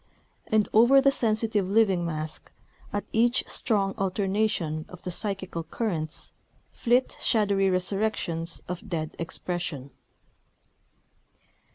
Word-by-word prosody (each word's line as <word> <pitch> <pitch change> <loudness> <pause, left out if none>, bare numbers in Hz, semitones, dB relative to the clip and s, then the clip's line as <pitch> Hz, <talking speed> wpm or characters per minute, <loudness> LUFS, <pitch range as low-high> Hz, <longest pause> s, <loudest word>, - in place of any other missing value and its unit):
And 215 -1 +2
over 240 +5 +7
the 275 0 +4
sensitive 215 -5 +1
living 195 -4 +3
mask, 155 -2 -5 0.4
at 205 - -2
each 240 +2 +3
strong 195 -4 +1
alternation 195 -5 0
of 180 - -12
the 180 - -3
psychical 190 -2 -2
currents, 165 -3 -3 0.4
flit 245 +2 +1
shadowy 200 -4 +2
resurrections 185 -3 -1
of 180 +4 -6
dead 160 -3 -3
expression. 165 -5 -4
195 Hz, 100 wpm, -27 LUFS, 170-220 Hz, 0.4 s, over